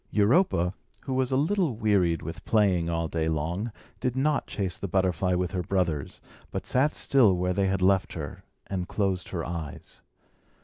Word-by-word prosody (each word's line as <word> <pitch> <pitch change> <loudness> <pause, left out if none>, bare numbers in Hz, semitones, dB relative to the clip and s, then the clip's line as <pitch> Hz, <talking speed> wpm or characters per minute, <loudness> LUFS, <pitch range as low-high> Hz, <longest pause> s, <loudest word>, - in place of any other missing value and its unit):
Europa, 105 - +3 0.3
who 135 - -4
was 130 -1 +1
a 130 - +3
little 160 - +1
wearied 100 -7 +2
with - - -7
playing 95 -6 +2
all 85 -1 -1
day 80 0 -1
long, 85 +8 -1 0.3
did 125 -1 -1
not 145 +2 +1
chase 95 -3 -3
the 100 - -4
butterfly 90 -1 +1
with 90 -1 -1
her 90 - -1
brothers, 85 -6 -1 0.3
but - - -4
sat 135 +4 +2
still 115 -10 +4
where 90 +1 0
they 95 +1 +1
had 95 -1 0
left 95 0 +3
her, 75 -4 -6 0.2
and 90 -2 -3
closed 95 -3 -1
her 85 -4 -3
eyes. 80 -4 -7
95 Hz, 175 wpm, -27 LUFS, 85-115 Hz, 0.3 s, still